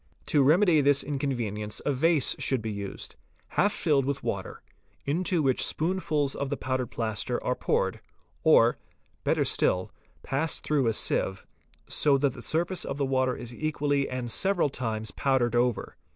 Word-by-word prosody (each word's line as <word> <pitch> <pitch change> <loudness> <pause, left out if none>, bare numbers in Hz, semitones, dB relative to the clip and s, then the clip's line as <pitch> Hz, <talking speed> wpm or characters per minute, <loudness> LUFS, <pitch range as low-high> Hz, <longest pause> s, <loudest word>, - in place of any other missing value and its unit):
To 145 - +2
remedy 165 +5 +5
Fig. 145 - +2
100. - - +5
this 140 -1 +4
inconvenience 120 -7 -2
a 145 - +1
vase 155 +1 +3
should 130 - +1
be 110 - -3
used, 100 -1 -6 0.3
half 205 - +2
filled 150 -8 +1
with 140 0 -2
water, - - -4 0.4
into 170 +3 +1
which 130 -2 +2
spoonfuls 155 -4 0
of 140 - -3
the 140 - -2
powdered 130 -1 -2
plaster 110 -3 -2
are - - +1
poured, - - -1 0.4
or, - - +5 0.4
better - - +1
still, 90 0 +1 0.3
passed 145 +4 -2
through 145 -5 +1
a 115 - +2
sieve, 95 -2 -1 0.4
so 145 -2 +3
that 135 -2 +1
the 125 - -10
surface 175 +3 -1
of - - -4
the 140 - 0
water 130 -1 +1
is 120 0 -7
equally 145 -1 -1
and 125 -2 -4
several 190 - +2
times 110 -4 -3
powdered 130 -4 +1
over. 120 -1 0
135 Hz, 165 wpm, -27 LUFS, 120-150 Hz, 0.4 s, remedy